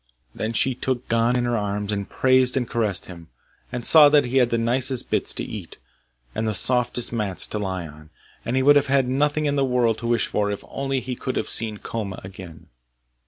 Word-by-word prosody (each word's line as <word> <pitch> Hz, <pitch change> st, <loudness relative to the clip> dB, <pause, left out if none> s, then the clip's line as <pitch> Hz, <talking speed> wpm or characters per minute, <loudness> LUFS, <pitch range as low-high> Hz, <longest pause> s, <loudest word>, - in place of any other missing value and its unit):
Then 110 Hz, +1 st, -4 dB
she 130 Hz, +4 st, +2 dB
took 125 Hz, 0 st, -3 dB
Gon 115 Hz, +1 st, +2 dB
in 120 Hz, -1 st, 0 dB
her 120 Hz, 0 st, 0 dB
arms, 105 Hz, -1 st, -2 dB
and 100 Hz, -1 st, -4 dB
praised 130 Hz, 0 st, +3 dB
and 125 Hz, -2 st, -1 dB
caressed 110 Hz, -6 st, 0 dB
him, 85 Hz, -3 st, -12 dB, 0.4 s
and 120 Hz, -2 st, -5 dB
saw 150 Hz, -2 st, +8 dB
that 145 Hz, 0 st, +4 dB
he 125 Hz, +2 st, -1 dB
had 125 Hz, -2 st, +3 dB
the 115 Hz, -, 0 dB
nicest 125 Hz, +2 st, 0 dB
bits -, -, 0 dB
to -, -, -3 dB
eat, -, -, -8 dB, 0.6 s
and 110 Hz, -, -2 dB
the 110 Hz, -, +1 dB
softest 120 Hz, +3 st, +2 dB
mats 105 Hz, -5 st, -1 dB
to 105 Hz, -, -4 dB
lie 95 Hz, -3 st, -4 dB
on; 75 Hz, 0 st, -14 dB, 0.3 s
and 120 Hz, -, -3 dB
he 130 Hz, -, +1 dB
would 145 Hz, +1 st, +6 dB
have 145 Hz, -, +1 dB
had 135 Hz, -1 st, +2 dB
nothing 145 Hz, +4 st, 0 dB
in 145 Hz, -1 st, 0 dB
the 140 Hz, -, +2 dB
world 125 Hz, -4 st, +1 dB
to 115 Hz, -, -5 dB
wish 120 Hz, -1 st, +1 dB
for 105 Hz, -1 st, -1 dB
if 100 Hz, -, -5 dB
only 135 Hz, -1 st, -3 dB
he 125 Hz, 0 st, -5 dB
could 130 Hz, +1 st, -5 dB
have -, -, -2 dB
seen 110 Hz, -2 st, 0 dB
Koma 100 Hz, -3 st, -6 dB
again. 95 Hz, -4 st, -12 dB
120 Hz, 220 wpm, -23 LUFS, 105-130 Hz, 0.6 s, saw